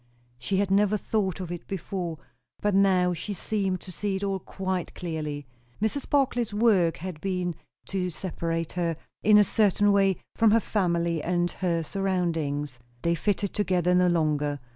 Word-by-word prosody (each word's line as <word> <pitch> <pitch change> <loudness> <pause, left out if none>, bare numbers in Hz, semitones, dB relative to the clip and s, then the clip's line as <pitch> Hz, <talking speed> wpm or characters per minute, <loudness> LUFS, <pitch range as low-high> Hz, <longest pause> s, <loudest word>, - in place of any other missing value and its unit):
She 190 +10 -1
had 195 -1 +1
never 205 +1 +3
thought 195 -3 -1
of 180 -2 -5
it 175 -1 -6
before, 180 -3 -4 0.4
but 205 -1 +1
now 185 -2 +4
she 195 +5 -4
seemed 190 -1 -1
to 185 - -9
see 200 +2 -2
it 190 - -3
all 195 -1 -1
quite 190 -2 -4
clearly. 150 -4 -4 0.3
Mrs. 220 +7 -2
Barclay's 245 -6 +1
work 205 -7 +3
had 175 -2 -6
been, 180 -2 -1 0.4
to 185 -2 -1
separate 165 -1 -3
her, 170 -3 -1 0.2
in 210 0 +6
a 210 - +8
certain 205 0 +3
way, 195 -2 +3 0.2
from 225 -1 +5
her 225 +2 +5
family 170 -6 0
and 175 +1 0
her 170 -3 -1
surroundings. 160 -8 -1 0.2
They 170 - +2
fitted 200 +3 -1
together 180 -3 +1
no 180 0 +4
longer. 150 -4 +1
185 Hz, 165 wpm, -27 LUFS, 170-200 Hz, 0.4 s, a